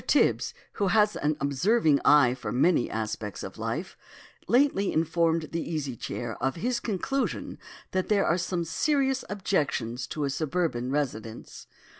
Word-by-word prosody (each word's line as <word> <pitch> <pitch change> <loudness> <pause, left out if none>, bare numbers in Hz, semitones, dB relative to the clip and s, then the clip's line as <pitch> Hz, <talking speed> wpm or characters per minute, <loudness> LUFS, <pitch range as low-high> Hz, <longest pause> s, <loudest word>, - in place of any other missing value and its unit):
Tibs, - - +2 0.2
who 200 - 0
has 210 +2 +3
an 150 0 0
observing 150 - +2
eye 140 -5 +6
for 125 0 -5
many 135 +1 +3
aspects 110 -2 -4
of - - -8
life, - - -3 0.5
lately 245 -6 +3
informed 165 0 +1
the 165 - -2
Easy 150 -7 -3
Chair 115 0 -5
of 135 +1 0
his 240 +8 -1
conclusion 240 +6 -2 0.3
that 185 0 -1
there 205 -2 +3
are 175 +3 +2
some 175 -1 -2
serious 270 - +1
objections 145 - -1
to 150 - -3
a 140 - 0
suburban 155 -4 -1
residence. 120 -6 -4
160 Hz, 145 wpm, -27 LUFS, 135-200 Hz, 0.5 s, eye